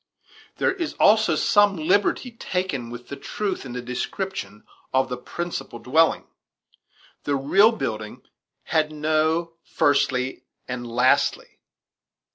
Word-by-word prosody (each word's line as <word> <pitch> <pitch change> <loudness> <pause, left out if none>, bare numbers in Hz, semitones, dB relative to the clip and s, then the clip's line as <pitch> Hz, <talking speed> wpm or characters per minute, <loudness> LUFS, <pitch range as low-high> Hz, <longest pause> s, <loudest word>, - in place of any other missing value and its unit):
There - - +2
is 345 -5 -4
also 215 +1 +4
some 205 -1 +4
liberty 200 +9 +1
taken 180 - -3
with 120 +1 -9
the 140 - -5
truth 190 -2 -4
in 120 - -7
the 125 0 -5
description 125 - -5 0.3
of 130 0 +2
the 125 - -3
principal 170 -1 -5
dwelling; 155 +8 +2 1.0
the 145 - 0
real 195 +11 +5
building 110 - -5 0.4
had 155 -2 0
no 155 +2 0
"firstly" 130 -4 +1 0.3
and 125 -1 -5
"lastly." 125 +2 +1
155 Hz, 115 wpm, -24 LUFS, 125-190 Hz, 1.0 s, real